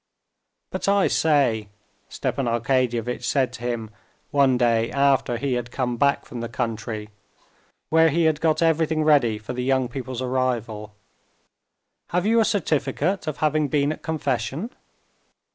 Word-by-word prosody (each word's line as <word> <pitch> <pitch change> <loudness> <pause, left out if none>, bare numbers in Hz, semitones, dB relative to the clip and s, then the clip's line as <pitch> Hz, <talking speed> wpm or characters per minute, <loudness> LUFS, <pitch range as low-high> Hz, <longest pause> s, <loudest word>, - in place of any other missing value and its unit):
"But - - -3
I 200 0 +4
say," 135 -9 +2 0.4
Stepan 135 -3 -2
Arkadyevitch 120 0 0
said 135 -3 +1
to - - -9
him 120 -3 -3 0.4
one 135 -3 +4
day 115 -2 +2
after 135 -3 +2
he 135 +2 -1
had 120 -1 -2
come 125 -1 -2
back 140 +3 +2
from 120 - -8
the 115 0 -4
country, 110 -1 -4 0.8
where 160 0 +5
he 165 +3 +1
had 160 -1 +2
got 160 0 +2
everything 160 -1 +2
ready 140 -8 +3
for 105 +3 -7
the 125 0 -3
young 130 -1 +1
people's 130 0 -5
arrival, 115 -5 -2 1.1
"have 180 +2 0
you 230 +2 +4
a 225 - +4
certificate 160 -1 0
of 150 -4 -3
having 155 0 +1
been 140 +1 +1
at - - -6
confession?" 145 - -2
130 Hz, 145 wpm, -23 LUFS, 120-155 Hz, 1.1 s, where